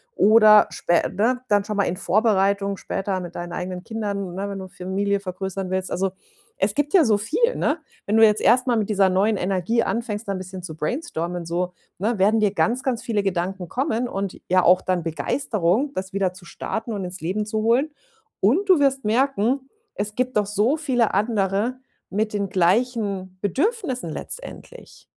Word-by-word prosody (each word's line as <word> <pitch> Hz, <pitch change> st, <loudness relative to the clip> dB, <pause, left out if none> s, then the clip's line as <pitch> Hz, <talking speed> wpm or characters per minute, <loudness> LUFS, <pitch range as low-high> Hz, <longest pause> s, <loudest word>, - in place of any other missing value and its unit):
oder 215 Hz, 0 st, +7 dB
spä 170 Hz, 0 st, +1 dB
ne? 240 Hz, +6 st, +1 dB
Dann 205 Hz, -1 st, +3 dB
schon 210 Hz, -1 st, -4 dB
mal 200 Hz, -, +3 dB
in 180 Hz, -1 st, -2 dB
Vorbereitung 200 Hz, -1 st, +1 dB
später 195 Hz, -1 st, -3 dB
mit 175 Hz, -1 st, -8 dB
deinen 175 Hz, 0 st, -6 dB
eigenen 180 Hz, 0 st, -5 dB
Kindern, 200 Hz, -5 st, -4 dB
ne? 195 Hz, +2 st, -4 dB
Wenn 200 Hz, -, -5 dB
du 190 Hz, -, -7 dB
Familie 195 Hz, +2 st, -2 dB
vergrößern 190 Hz, 0 st, -5 dB
willst. 185 Hz, 0 st, -2 dB
Also, 190 Hz, +1 st, 0 dB, 0.5 s
es 195 Hz, +1 st, +2 dB
gibt 290 Hz, -, -1 dB
ja 335 Hz, -, +6 dB
so 215 Hz, -3 st, +3 dB
viel, 460 Hz, -, +1 dB
ne? 295 Hz, +3 st, 0 dB, 0.3 s
Wenn 210 Hz, +2 st, +2 dB
du 225 Hz, -, +8 dB
jetzt 210 Hz, -1 st, +3 dB
erst 250 Hz, +2 st, +4 dB
mal 245 Hz, -, +3 dB
mit 210 Hz, -1 st, -1 dB
dieser 195 Hz, -2 st, +3 dB
neuen 200 Hz, +3 st, +2 dB
Energie 195 Hz, +5 st, 0 dB
anfängst, 225 Hz, -2 st, -3 dB
da -, -, -1 dB
'n -, -, -3 dB
bisschen 185 Hz, 0 st, -8 dB
zu 160 Hz, -3 st, -7 dB
brainstormen 175 Hz, -, -3 dB
so, 175 Hz, +2 st, -2 dB, 0.3 s
ne? 220 Hz, +4 st, 0 dB
Werden 210 Hz, +4 st, +3 dB
dir 210 Hz, -2 st, +3 dB
ganz, 235 Hz, +5 st, +1 dB
ganz 250 Hz, -4 st, -1 dB
viele 215 Hz, -3 st, 0 dB
Gedanken 185 Hz, -1 st, -2 dB
kommen 250 Hz, -2 st, -1 dB
und 195 Hz, -2 st, -4 dB
ja 185 Hz, 0 st, +4 dB
auch 180 Hz, +1 st, +5 dB
dann 180 Hz, -2 st, -1 dB
Begeisterung, 210 Hz, -, 0 dB
das 190 Hz, +1 st, -4 dB
wieder 190 Hz, -2 st, 0 dB
zu 180 Hz, -, -10 dB
starten 225 Hz, +6 st, -5 dB
und 200 Hz, -3 st, -3 dB
ins 180 Hz, +1 st, -6 dB
Leben 195 Hz, +6 st, -2 dB
zu 220 Hz, 0 st, -2 dB
holen. 245 Hz, +7 st, +2 dB, 0.5 s
Und 290 Hz, -, +3 dB
du 365 Hz, -4 st, +6 dB
wirst 275 Hz, -3 st, +2 dB
merken, 260 Hz, +2 st, +1 dB, 0.2 s
es 210 Hz, +1 st, -3 dB
gibt 255 Hz, 0 st, -1 dB
doch 210 Hz, -, +2 dB
so 210 Hz, +8 st, +1 dB
viele 255 Hz, -8 st, +1 dB
andere 205 Hz, +2 st, 0 dB, 0.3 s
mit 215 Hz, +2 st, -1 dB
den 200 Hz, -1 st, -1 dB
gleichen 195 Hz, 0 st, 0 dB
Bedürfnissen 270 Hz, -, -1 dB
letztendlich. -, -, -7 dB
205 Hz, 190 wpm, -23 LUFS, 185-235 Hz, 0.5 s, du